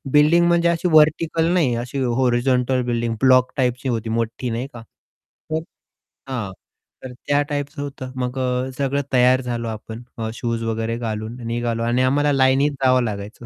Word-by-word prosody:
Building 155 +4 +5
म्हणजे 170 0 +3
अशी 170 +2 0
vertical 155 +1 +4
नाही 155 -9 +2
अशी 125 +4 -4
हॉरिझॉन्टल 125 +1 +1
बिल्डिंग 120 -1 -1
ब्लॉक 130 -1 +5
टाइपची 125 0 0
होती 115 -2 -2
मोठी 115 +2 -2
नाही 120 +3 -3
का? 120 - -9 0.7
तर 160 0 0 0.7
हां, 115 -7 -3 0.5
तर 130 -1 -7
त्या 145 0 +3
टाइपच 145 0 -4
होतं. 135 -2 -6
मग 125 0 -3
अ, 125 0 -1
सगळं 140 0 0
तयार 130 +1 +4
झालो 120 -2 -3
आपण. 110 +1 -7 0.3
शूज 115 -1 -3
वगैरे 115 0 -2
घालून 110 -1 -4
निघालो 115 0 -2
आणि 120 +2 +1
आम्हाला 145 +3 +2
लाईनीत 135 +2 +3
जावं 130 -1 +4
लागायचं 105 +1 -6
125 Hz, 155 wpm, -21 LUFS, 115-140 Hz, 0.7 s, बिल्डिंग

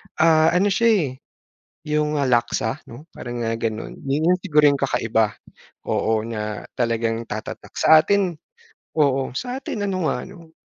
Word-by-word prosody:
Ah, 160 0 +5
ano 200 +3 +3
siya, 230 +4 +2
eh, 165 -8 +1 0.8
yung 150 0 0
Laksa, 120 -1 0
'no, 125 +7 -11
parang 120 -1 -5
nga 115 - -1
ganun. 110 -1 -4
'Yon 145 +3 +1
yung 180 - 0
siguro 150 -6 +3
yung 140 - -2
kakaiba 115 -5 +1 0.5
oo, 110 -1 +1
na 105 -2 -5
talagang 115 -1 0
tatatak. 110 0 -7
Sa 160 0 +7
atin 195 -4 +1 0.6
oo, 135 -4 +1
sa 250 - -3
atin 225 -6 -4
ano 185 -4 -1
nga, 125 -3 -1
'no, 170 -4 -14
140 Hz, 150 wpm, -22 LUFS, 115-165 Hz, 0.8 s, Sa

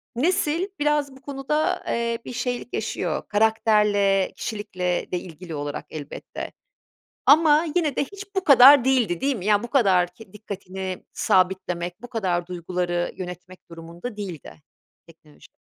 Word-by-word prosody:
nesil 335 +4 +1
biraz 295 -1 +1
bu 265 - -16
konuda, 300 +6 -1
eee, 235 0 -1
bir - - -7
şeylik 245 0 -3
yaşıyor. - - -2
Karakterle, 210 -2 +2
kişilikle 185 -5 -3
de 180 - 0
ilgili 170 -1 -9
olarak 145 0 -5
elbette. 150 -2 -7 0.8
Ama 310 +1 +6
yine 310 -6 +1
de - - +1
hiç 400 +6 -10
bu 380 - 0
kadar 275 -1 +8
değildi, 245 -10 +2
değil 275 -1 +1
mi? 185 - -7
Ya, 210 -1 +3
bu 240 - -5
kadar 185 -9 +3
k 220 -1 -15
dikkatini 190 -2 -6
sabitlemek, 180 0 0
bu 245 - -8
kadar 185 -7 -1
duyguları 175 0 -2
yönetmek 180 0 -9
durumunda 170 +7 -8
değildi 180 -7 -8 0.4
teknoloji. 155 -2 -19
205 Hz, 140 wpm, -24 LUFS, 180-265 Hz, 0.8 s, kadar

